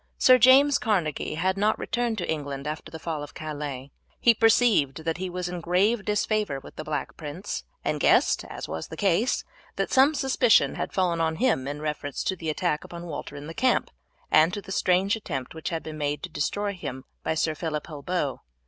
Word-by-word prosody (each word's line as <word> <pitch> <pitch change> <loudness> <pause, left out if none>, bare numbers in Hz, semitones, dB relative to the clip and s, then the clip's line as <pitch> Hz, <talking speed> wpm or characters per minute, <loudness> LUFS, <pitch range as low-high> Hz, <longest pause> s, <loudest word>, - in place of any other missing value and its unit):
Sir 255 0 +6
James 275 +3 +6
Carnegie 175 - -1
had 185 +4 0
not 210 +2 +2
returned 240 -2 -1
to 180 - -3
England 140 -3 -3
after 155 +1 -5
the 160 - -6
fall 160 -2 -4
of 145 - -9
Calais; 145 -4 -5 0.3
he 235 - +6
perceived 220 - +3
that 165 0 -1
he 185 0 -3
was 180 0 -3
in 175 -1 -5
grave 195 +6 +2
disfavour 210 -7 0
with - - -13
the 155 - -6
Black 155 -1 -4
Prince, 165 +6 -5 0.2
and - - 0
guessed, - - +4
as - - -7
was - - -5
the - - -9
case, 200 +4 +1 0.3
that - - -2
some 275 +3 +5
suspicion 260 -4 +3
had - - -4
fallen 175 -3 +1
on 160 -1 +1
him 220 - +1
in 145 +1 -5
reference 150 -2 -3
to 190 - -1
the 165 -3 -4
attack 155 0 -1
upon 170 0 -8
Walter 150 -3 -6
in 145 0 -8
the 165 - -7
camp, 255 +7 +1 0.4
and 160 +2 +6
to - - -3
the 190 - -9
strange 190 +2 +2
attempt 145 - -5
which 160 +2 -4
had 165 -2 -3
been 155 -1 -7
made 145 0 -2
to 180 - -4
destroy 200 +7 -2
him 130 -8 -7 0.2
by 160 - -1
Sir 160 0 +1
Phillip 155 -1 -3
Holbeaut. 150 -1 -3
170 Hz, 205 wpm, -26 LUFS, 150-205 Hz, 0.4 s, Sir